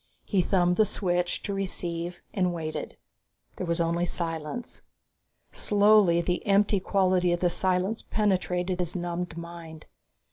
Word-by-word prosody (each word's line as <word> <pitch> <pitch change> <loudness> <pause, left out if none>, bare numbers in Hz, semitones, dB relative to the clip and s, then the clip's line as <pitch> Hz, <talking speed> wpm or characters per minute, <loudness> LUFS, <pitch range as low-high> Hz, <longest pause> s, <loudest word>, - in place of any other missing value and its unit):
He 195 -3 +2
thumbed 180 -1 +2
the 220 - +6
switch 180 -3 -1
to 200 - -3
receive 175 -3 -3
and 180 -2 0
waited. 155 -1 -5 0.6
There 185 - -4
was 170 +1 0
only 170 +1 +1
silence. 165 +7 -4 0.7
Slowly, 205 -4 +4
the 180 +1 -1
empty 200 0 +3
quality 185 -2 +2
of 175 - +1
the 175 -1 +2
silence 185 +4 0
penetrated 185 -3 0
his 175 0 -2
numbed 175 -1 -3
mind. 170 -2 -9
180 Hz, 135 wpm, -27 LUFS, 170-195 Hz, 0.7 s, the